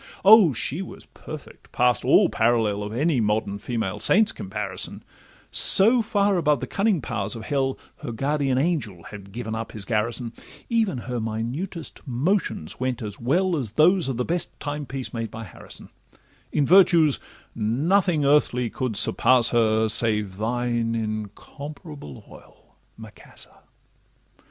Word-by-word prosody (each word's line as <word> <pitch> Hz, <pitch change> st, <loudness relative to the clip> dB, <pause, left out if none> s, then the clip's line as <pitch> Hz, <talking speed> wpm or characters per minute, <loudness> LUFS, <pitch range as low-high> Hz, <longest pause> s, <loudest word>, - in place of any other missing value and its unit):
O! 205 Hz, -5 st, +8 dB
she 135 Hz, -, -2 dB
was 190 Hz, -, -10 dB
perfect 155 Hz, -3 st, -12 dB
past 125 Hz, -3 st, +1 dB
all -, -, +5 dB
parallel— 110 Hz, -3 st, +1 dB
Of 105 Hz, 0 st, -5 dB
any 140 Hz, +4 st, 0 dB
modern 105 Hz, -1 st, -1 dB
female 105 Hz, -3 st, -3 dB
saint's 215 Hz, -, +3 dB
comparison; 95 Hz, -1 st, -5 dB, 0.5 s
So 230 Hz, +5 st, +6 dB
far 205 Hz, -3 st, +1 dB
above 150 Hz, -5 st, +2 dB
the 130 Hz, -, -4 dB
cunning 195 Hz, -, 0 dB
powers 105 Hz, -4 st, -2 dB
of 115 Hz, -, -8 dB
hell, 135 Hz, +1 st, -1 dB, 0.2 s
Her -, -, -7 dB
guardian 135 Hz, +2 st, -1 dB
angel 130 Hz, -, -1 dB
had 100 Hz, 0 st, -11 dB
given 110 Hz, +1 st, -5 dB
up 110 Hz, 0 st, -5 dB
his 105 Hz, -3 st, -3 dB
garrison; 115 Hz, +2 st, -2 dB, 0.4 s
Even 225 Hz, -, +1 dB
her 120 Hz, 0 st, -4 dB
minutest 120 Hz, -, -5 dB
motions 135 Hz, -, -2 dB
went 130 Hz, -2 st, -2 dB
as 105 Hz, -1 st, -7 dB
well 175 Hz, +9 st, +1 dB
As 120 Hz, -9 st, -3 dB
those 175 Hz, +5 st, +3 dB
of 130 Hz, -3 st, -3 dB
the 125 Hz, -, -1 dB
best 175 Hz, 0 st, -2 dB
time 145 Hz, -1 st, -5 dB
piece 135 Hz, 0 st, -6 dB
made 115 Hz, -2 st, -4 dB
by 115 Hz, -, -8 dB
Harrison: 95 Hz, -, -10 dB, 0.6 s
In 145 Hz, -, +1 dB
virtues 170 Hz, -3 st, +5 dB, 0.3 s
nothing 150 Hz, -, +1 dB
earthly 125 Hz, -4 st, +2 dB
could 125 Hz, -4 st, -3 dB
surpass 125 Hz, +3 st, +5 dB
her, 110 Hz, -2 st, +2 dB
Save 105 Hz, -3 st, +1 dB
thine 120 Hz, +1 st, -1 dB
'incomparable 110 Hz, -, -7 dB
oil,' -, -, -18 dB, 0.2 s
Macassar! 110 Hz, -2 st, -13 dB
125 Hz, 140 wpm, -24 LUFS, 110-155 Hz, 0.6 s, O